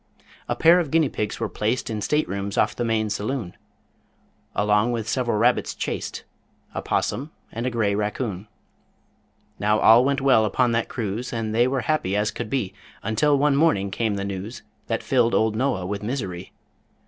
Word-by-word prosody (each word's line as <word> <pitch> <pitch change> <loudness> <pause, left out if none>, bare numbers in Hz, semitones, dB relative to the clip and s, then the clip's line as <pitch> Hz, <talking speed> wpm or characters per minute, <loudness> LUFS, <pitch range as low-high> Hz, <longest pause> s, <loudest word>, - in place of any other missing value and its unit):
A - - +1
pair 170 +2 +6
of 165 -5 -2
guinea 160 -1 +3
pigs 105 -3 -3
were 115 - -1
placed 110 +5 -1
In 110 -2 -3
state 150 +8 +1
rooms 100 +1 -4
off - - +2
the 120 - -2
main 110 -2 0
saloon, 105 -1 -3 1.0
Along 105 +3 +2
with 115 -2 -3
several 120 -3 0
rabbits 120 +3 +2
chaste, - - -4 0.5
A - - -3
'possum 140 +4 -1 0.2
and 115 +3 -3
a - - +2
gray 110 -4 0
raccoon. 105 -1 -3 1.1
Now 105 +2 +2
all 115 +3 +7
went 140 +1 +1
well 135 -5 +4
upon 120 +4 +2
that 115 0 0
cruise, 115 +1 -3
And 115 -2 -3
they 120 +2 +4
were 130 0 0
happy 120 -12 0
as 105 +1 +1
could - - -5
be, 110 -8 -1 0.3
Until 125 +7 +2
one 145 0 +3
morning 140 -11 +2
came 110 +1 -1
the 100 0 -3
news 100 +4 -6 0.2
That 115 - -2
filled 120 -3 +2
old 110 -1 +2
Noah 115 -6 0
with 100 +2 -3
misery. 100 -6 -4
115 Hz, 180 wpm, -24 LUFS, 105-130 Hz, 1.1 s, all